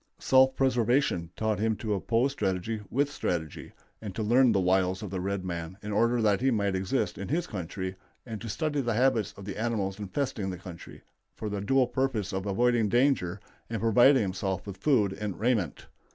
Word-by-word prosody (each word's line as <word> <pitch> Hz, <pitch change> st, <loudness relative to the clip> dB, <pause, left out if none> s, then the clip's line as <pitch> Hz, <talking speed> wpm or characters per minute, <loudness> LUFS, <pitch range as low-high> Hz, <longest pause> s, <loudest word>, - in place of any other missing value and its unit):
Self 130 Hz, 0 st, +4 dB
preservation 120 Hz, -, +1 dB
taught 110 Hz, -2 st, -1 dB
him 110 Hz, +1 st, +1 dB
to 105 Hz, 0 st, -2 dB
oppose 115 Hz, +7 st, +1 dB
strategy 105 Hz, -2 st, -2 dB
with 140 Hz, +3 st, +1 dB
strategy, 80 Hz, -, -3 dB, 0.3 s
and 105 Hz, -4 st, -7 dB
to 110 Hz, -, -2 dB
learn 120 Hz, +3 st, +5 dB
the 100 Hz, -, +2 dB
wiles 95 Hz, +1 st, +1 dB
of 100 Hz, -, -6 dB
the 95 Hz, -, -2 dB
red 95 Hz, 0 st, -2 dB
man 85 Hz, 0 st, -5 dB
in 105 Hz, -, -4 dB
order 115 Hz, +3 st, +2 dB
that 105 Hz, 0 st, +3 dB
he 135 Hz, -, +3 dB
might 100 Hz, -5 st, +1 dB
exist 95 Hz, +8 st, -1 dB
in -, -, -4 dB
his 170 Hz, +3 st, 0 dB
country, 95 Hz, -, -5 dB, 0.3 s
and 110 Hz, -4 st, -6 dB
study 145 Hz, -, -1 dB
the 120 Hz, -3 st, -1 dB
habits 115 Hz, -4 st, +2 dB
of 100 Hz, -, -9 dB
the 100 Hz, 0 st, -6 dB
animals 105 Hz, -4 st, -1 dB
infesting 105 Hz, -1 st, -2 dB
the 90 Hz, -, -5 dB
country, 85 Hz, -1 st, -11 dB, 0.3 s
for 110 Hz, -, -4 dB
the 100 Hz, -1 st, -3 dB
dual 130 Hz, +5 st, +3 dB
purpose 125 Hz, -8 st, -1 dB
of 95 Hz, +1 st, -3 dB
avoiding 115 Hz, +2 st, +2 dB
danger 120 Hz, -7 st, +2 dB, 0.3 s
and 115 Hz, -1 st, -2 dB
providing 120 Hz, +3 st, +5 dB
himself 95 Hz, -1 st, -3 dB
with 100 Hz, -2 st, -7 dB
food 105 Hz, -3 st, +2 dB
and 100 Hz, -2 st, -5 dB
raiment. 110 Hz, -, 0 dB
105 Hz, 190 wpm, -28 LUFS, 95-120 Hz, 0.3 s, learn